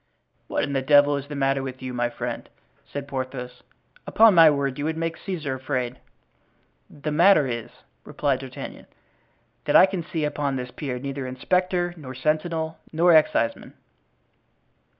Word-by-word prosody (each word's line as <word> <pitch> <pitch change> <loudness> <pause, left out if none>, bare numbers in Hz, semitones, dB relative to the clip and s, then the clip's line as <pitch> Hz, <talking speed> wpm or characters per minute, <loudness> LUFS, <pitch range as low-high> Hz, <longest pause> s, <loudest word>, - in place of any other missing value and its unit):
"What - - -1
in 140 - -2
the 135 - +1
devil 145 +1 +5
is 140 0 -6
the 145 - -7
matter 135 0 +1
with 130 -1 -6
you, 130 -1 -5
my 120 -1 0
friend?" - - -6 0.4
said 140 -1 -5
Porthos. 130 -2 -5 0.5
"Upon 225 -1 +6
my 165 -2 +8
word 140 -2 -1
you 145 - -2
would 160 0 -2
make 165 0 -2
Caesar 160 -8 -4
afraid." 130 -2 -3 0.9
"The 150 +1 -5
matter 165 0 +5
is," 120 -3 -4 0.3
replied - - -1
D'Artagnan, - - -9 0.8
"that - - +1
I - - +9
can 190 -2 -3
see 160 -1 -3
upon 145 -2 -2
this 125 -1 -5
pier 130 -4 -5
neither 135 0 -5
inspector 175 +7 0
nor 130 -4 -9
sentinel 160 +3 -1
nor 170 +2 +4
exciseman." 150 -7 +1
145 Hz, 155 wpm, -24 LUFS, 130-160 Hz, 0.9 s, I